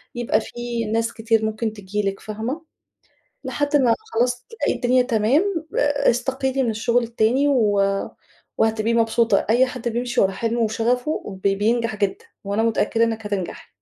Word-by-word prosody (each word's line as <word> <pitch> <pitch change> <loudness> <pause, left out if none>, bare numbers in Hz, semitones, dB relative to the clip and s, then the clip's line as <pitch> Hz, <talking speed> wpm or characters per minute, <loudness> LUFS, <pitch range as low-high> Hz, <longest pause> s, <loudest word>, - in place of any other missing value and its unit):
يبقى 235 -2 +1
في 240 0 -4
ناس 225 +2 -1
كتير 225 -1 +1
ممكن 220 0 -2
تيجي 205 0 -3
لِك 195 - -7
فاهمة؟ 225 +9 -4 0.8
لحد 290 0 0
ما 250 -5 +4 0.2
خلاص 245 +1 0
تلاقي 455 - -1
الدنيا 250 0 +3
تمام 285 - +1
ا 290 0 +2
استقيلي 265 +2 -1
من 235 - +1
الشغل 235 +2 +1
التاني 235 +4 +1
و 215 -7 +3 0.8
وهتبقي 220 +1 +1
مبسوطة. 230 -2 +2
أي 245 +3 +5
حد 250 -2 -4
بيمشي 240 +1 -1
ورا 195 - +3
حلمه 230 +4 -2
وشغفه 240 +6 0 0.2
ب 200 - +5
بينجح 220 +3 0
جدًا، 200 -2 -2 0.2
وأنا 200 +3 0
متأكدة 225 0 +2
إنِك 225 -2 -3
هتنجحي. 200 -4 -4
230 Hz, 150 wpm, -22 LUFS, 220-250 Hz, 0.8 s, أي